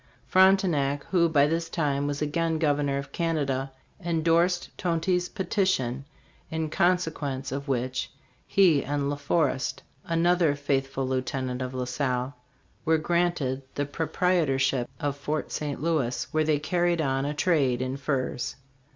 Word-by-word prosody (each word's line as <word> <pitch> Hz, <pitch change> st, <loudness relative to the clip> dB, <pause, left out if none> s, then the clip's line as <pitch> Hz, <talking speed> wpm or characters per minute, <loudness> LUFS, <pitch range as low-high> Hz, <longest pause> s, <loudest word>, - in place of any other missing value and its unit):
Frontenac, 180 Hz, -7 st, +3 dB
who 170 Hz, -3 st, +4 dB
by 145 Hz, -3 st, +4 dB
this 165 Hz, +2 st, -1 dB
time 145 Hz, -3 st, 0 dB
was 145 Hz, +1 st, -2 dB
again 165 Hz, +2 st, 0 dB
Governor 145 Hz, -3 st, +1 dB
of 140 Hz, 0 st, -6 dB
Canada, 140 Hz, -6 st, -1 dB, 0.3 s
endorsed 170 Hz, +1 st, +1 dB
Tonty's 180 Hz, +1 st, 0 dB
petition, 185 Hz, -, 0 dB, 0.4 s
in 160 Hz, -1 st, -3 dB
consequence 160 Hz, -8 st, 0 dB
of 140 Hz, +2 st, -4 dB
which 130 Hz, 0 st, -2 dB, 0.4 s
he 175 Hz, -8 st, +4 dB
and 145 Hz, 0 st, -1 dB
La -, -, -1 dB
Forest, 145 Hz, -1 st, 0 dB, 0.2 s
another 170 Hz, -2 st, +2 dB
faith 140 Hz, -1 st, 0 dB
ful 135 Hz, -1 st, -3 dB
lieutenant 130 Hz, -1 st, -2 dB
of 130 Hz, 0 st, -4 dB
La 125 Hz, -1 st, -2 dB
Salle, 125 Hz, +1 st, -1 dB, 0.5 s
were 160 Hz, 0 st, +3 dB
granted 160 Hz, -5 st, 0 dB
the 145 Hz, -, 0 dB
proprietorship 145 Hz, -5 st, +1 dB
of 145 Hz, -1 st, -1 dB
Fort 150 Hz, +2 st, -3 dB
St. 145 Hz, -2 st, -3 dB
Louis, 150 Hz, -7 st, 0 dB
where 155 Hz, -1 st, +1 dB
they 155 Hz, -1 st, +3 dB
carried 175 Hz, +3 st, +1 dB
on 135 Hz, -3 st, 0 dB
a 145 Hz, +1 st, -2 dB
trade 140 Hz, -7 st, +2 dB
in 130 Hz, +1 st, -2 dB
furs. 135 Hz, -3 st, -2 dB
145 Hz, 140 wpm, -27 LUFS, 135-170 Hz, 0.5 s, who